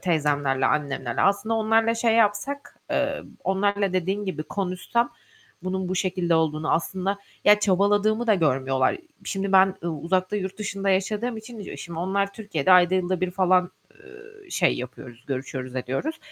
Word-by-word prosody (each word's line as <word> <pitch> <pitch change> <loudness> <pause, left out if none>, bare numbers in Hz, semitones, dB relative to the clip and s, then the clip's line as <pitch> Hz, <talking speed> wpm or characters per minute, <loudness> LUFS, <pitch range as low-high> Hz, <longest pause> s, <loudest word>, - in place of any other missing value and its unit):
teyzemlerle, 145 -6 +1
annemlerle... 135 -5 -1
Aslında 200 +3 +2
onlarla 225 +1 +2
şey 230 -1 +2
yapsak, 230 +6 0
eee, - - 0 0.2
onlarla 200 0 +1
dediğin 190 +3 -1
gibi 185 -5 -3
konuşsam 195 +7 -1 0.5
bunun 185 0 -2
bu 185 - -2
şekilde 180 -2 0
olduğunu 155 -1 +1
aslında 190 +4 -1 0.3
Ya, 210 0 +6
çabaladığımı 205 +3 +2
da 220 - +5
görmüyorlar. 135 -6 +1 0.3
Şimdi 195 0 -2
ben 190 0 +6
u 170 - -2
uzakta, 185 +5 -1
yurt 190 0 -4
dışında 200 -1 -3
yaşadığım 210 +5 0
için, 220 +1 -9
e, 200 - -7
şimdi 170 -1 -7
onlar 195 +3 0
Türkiye'de 190 -6 0
ayda 180 0 +6
yılda 185 -1 0
bir 185 -1 0
falan, 185 -1 +2 0.2
eee, 420 -2 -16
şey 175 - +2
yapıyoruz, 125 -1 -9
görüşüyoruz 130 -1 -5
ediyoruz. 135 - -3
190 Hz, 150 wpm, -25 LUFS, 165-205 Hz, 0.5 s, Ya